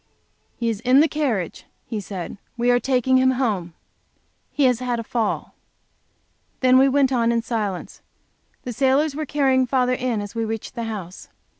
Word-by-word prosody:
"He 235 - -2
is 225 -3 -1
in 250 +4 +4
the 310 - +5
carriage," 255 - -2 0.2
he 220 - -4
said. 190 0 -7 0.2
"We 240 +1 +2
are 245 - +4
taking 260 0 +2
him 260 0 +4
home. 195 -10 -1 0.7
He 290 - -1
has 250 -3 +3
had 245 -2 -2
a - - -4
fall." 225 -1 -2 1.1
Then 255 0 +6
we 270 +1 +5
went 270 -1 +3
on 235 -2 +2
in 230 -1 0
silence. 210 -6 -4 0.6
The 245 - -5
sailors 275 +4 +2
were 310 -1 -4
carrying 265 -3 +2
father 250 0 +2
in 250 -3 -1
as 205 0 -6
we 230 -1 -2
reached 225 -1 -4
the 235 -2 -4
house. 195 -5 -7
245 Hz, 175 wpm, -22 LUFS, 225-260 Hz, 1.1 s, Then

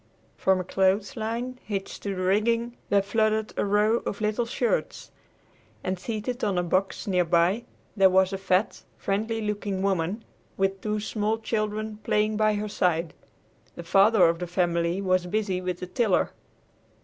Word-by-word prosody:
From 190 -1 +2
a - - -2
clothesline 220 +7 -1
hitched 195 -2 -5
to 200 -1 -3
the 185 - -3
rigging 230 +5 +1
there 200 -1 +3
fluttered 215 +1 0
a - - 0
row 210 +3 +3
of 200 - -4
little 215 +2 0
shirts, 240 0 -2 0.7
and 185 0 -2
seated 230 +5 -4
on 200 -3 +1
a 175 - +2
box 185 +3 -1
near 180 -3 +2
by 175 +7 +2 0.3
there 195 -2 +6
was 190 +1 +3
a 195 - -3
fat, 190 +2 0 0.2
friendly 220 +3 -1
looking 205 -2 -2
woman 195 +3 -1 0.3
with 195 0 0
two 215 0 -1
small 215 +1 -1
children 215 -1 -2
playing 215 0 0
by 215 0 +2
her 210 +1 -2
side. 170 -5 0 0.6
The 170 - -7
father 195 +2 +5
of 165 0 0
the 180 - -4
family 175 +1 0
was 185 -1 +1
busy 195 -1 -1
with 180 -1 -4
the - - -3
tiller. 195 +1 +1
200 Hz, 160 wpm, -26 LUFS, 185-215 Hz, 0.7 s, there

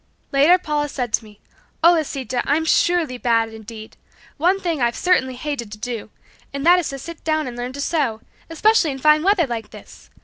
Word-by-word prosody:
Later 290 +6 +5
Paula 300 -4 -2
said 245 -5 -4
to - - +1
me, 210 -1 -17 0.4
"Oh, 340 - +8
Lisita, 270 -6 -2
I'm 310 +3 +1
surely 320 -7 +1
bad 230 -2 +1
indeed. 220 0 -11 0.4
One 360 +6 +2
thing 335 -7 -2
I've 235 -1 +1
certainly 260 -8 +1
hated 250 -5 -5
to - - -8
do, 230 -1 -5 0.4
and 280 +1 -4
that 355 +1 +6
is 345 - -3
to 275 - -5
sit 335 +5 -10
down 310 -1 0
and 245 -2 -6
learn 245 +1 -5
to 280 - -5
sew, 275 -8 -1 0.3
especially 355 +1 +3
in 270 - -4
fine 305 +3 +4
weather 380 -1 +3
like 230 -4 -5
this. - - -14
280 Hz, 200 wpm, -21 LUFS, 240-325 Hz, 0.4 s, Oh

